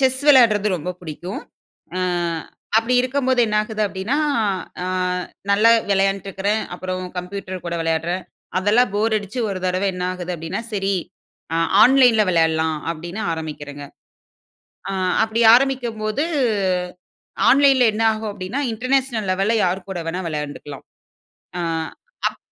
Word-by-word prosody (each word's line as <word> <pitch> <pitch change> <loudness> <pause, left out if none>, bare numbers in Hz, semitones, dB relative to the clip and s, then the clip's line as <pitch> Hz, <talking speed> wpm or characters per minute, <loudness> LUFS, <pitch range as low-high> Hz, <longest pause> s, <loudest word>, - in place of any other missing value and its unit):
Chess 260 0 +2
விளையாட்றது 225 -7 +6
ரொம்ப 175 +3 -4
பிடிக்கும். 175 +3 -6 0.6
அ - - -1 0.8
அப்பிடி 230 +3 +2
இருக்கும்போது 260 0 +1
என்னாகுது 215 +1 -1
அப்பிடின்னா, 200 +8 -2 0.7
அ - - -3 0.6
நல்லா 215 +3 +5 0.2
விளையாண்டுட்டு 195 0 +1
இருக்கிறேன். 205 +3 -1
அப்புறம் 185 0 -4 0.2
கம்ப்யூட்டர் 185 0 -6
கூட 170 - -3
விளையாட்றேன். 165 +3 -1 0.4
அதெல்லாம் 205 +3 +3
போர் 220 +2 +1
அடிச்சு 205 +4 -8
ஒரு 190 -2 -3
தடவ 185 +2 0
என்ன 180 - -3
ஆகுது 180 0 -5
அப்பிடின்னா, 165 +7 -4
சரி 195 -1 0 0.6
அ - - +1 0.3
ஆன்லைன்ல 245 -3 +6
விளையாட்லாம் 160 -1 +2 0.2
அப்பிடின்னு 175 +6 -6
ஆரம்பிக்கிறேங்க. 145 -3 -6 1.0
ஆ - - -3 0.3
அப்பிடி 225 +1 0
ஆரம்பிக்கும்போது, 245 -1 0 1.3
ஆன்லைன்‌ 275 0 +5
ல - - +6
என்ன 220 +1 -1
ஆகும் 220 0 -4
அப்பிடின்னா, 200 +9 -4
இன்டர்நேஷனல் 250 -2 0
லெவல்‌ல 195 +4 +1
யார்கூட 185 0 -3
வேணா 175 +3 -2
விளையாண்டுக்கலாம். 150 -2 -6 0.8
ஆ, - - -1 0.7
அப் - - -16
200 Hz, 125 wpm, -21 LUFS, 180-230 Hz, 1.3 s, விளையாட்றது